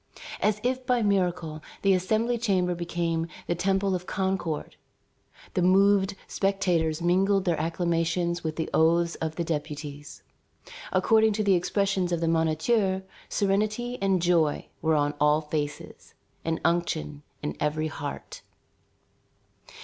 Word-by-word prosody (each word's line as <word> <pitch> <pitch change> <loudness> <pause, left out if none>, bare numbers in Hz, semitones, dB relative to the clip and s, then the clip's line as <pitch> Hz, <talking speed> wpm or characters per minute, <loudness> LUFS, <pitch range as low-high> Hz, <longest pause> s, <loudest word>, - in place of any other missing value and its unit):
As 210 0 +2
if 255 +1 0
by 245 -2 +2
miracle, 180 -6 0 0.2
the 195 -1 +5
Assembly 220 +6 +1
chamber 185 -6 +1
became 170 -1 -2 0.2
the - - 0
temple 190 +2 +1
of 180 0 -3
Concord. 190 -5 -2 0.8
The - - +1
moved 195 +2 +4
spectators 175 -5 0
mingled 190 +2 +2
their 170 -4 +1
acclamations 170 +1 0
with 160 -1 -2
the 160 - -2
oaths 170 +1 +3
of 160 -1 -2
the 170 - -1
deputies. 145 -2 -5 0.7
According 220 -1 +4
to 215 +1 -1
the 200 -1 +4
expressions 185 0 +1
of 170 - 0
the 165 - 0
Moniteur, 190 +5 +1 0.3
serenity 215 +5 0
and 190 -3 +2
joy 165 -4 +2
were 160 -1 +2
on 145 0 +1
all 150 +1 +4
faces, 150 -1 -5 0.3
and 165 0 -1
unction 75 - 0 0.2
in 75 - -3
every 150 +1 0
heart. 145 -2 -7
175 Hz, 130 wpm, -27 LUFS, 160-195 Hz, 0.8 s, the